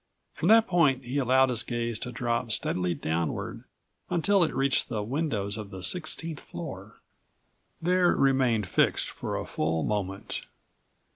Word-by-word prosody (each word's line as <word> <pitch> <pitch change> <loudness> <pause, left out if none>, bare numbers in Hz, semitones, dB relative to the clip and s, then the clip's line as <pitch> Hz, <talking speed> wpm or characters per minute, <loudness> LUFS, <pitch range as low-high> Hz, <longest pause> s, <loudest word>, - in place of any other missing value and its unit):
From 165 - -2
that 225 +2 +7
point 150 - +2
he 130 +4 -2
allowed 130 0 +4
his 120 -2 +2
gaze 120 -2 -2
to 125 - -5
drop 120 -1 -2
steadily 90 -4 0
downward 80 +2 -3 0.4
until 190 +2 +3
it 165 - 0
reached 135 0 +1
the 110 -4 -2
windows 115 -5 -2
of 105 -2 -7
the 95 -2 -8
sixteenth 160 - -2
floor. - - -8 0.8
There 180 +1 +3
it - - 0
remained 130 -7 +2
fixed - - +2
for - - -4
a - - -4
full 80 +1 -1
moment. 100 -2 -3
125 Hz, 150 wpm, -28 LUFS, 105-155 Hz, 0.8 s, that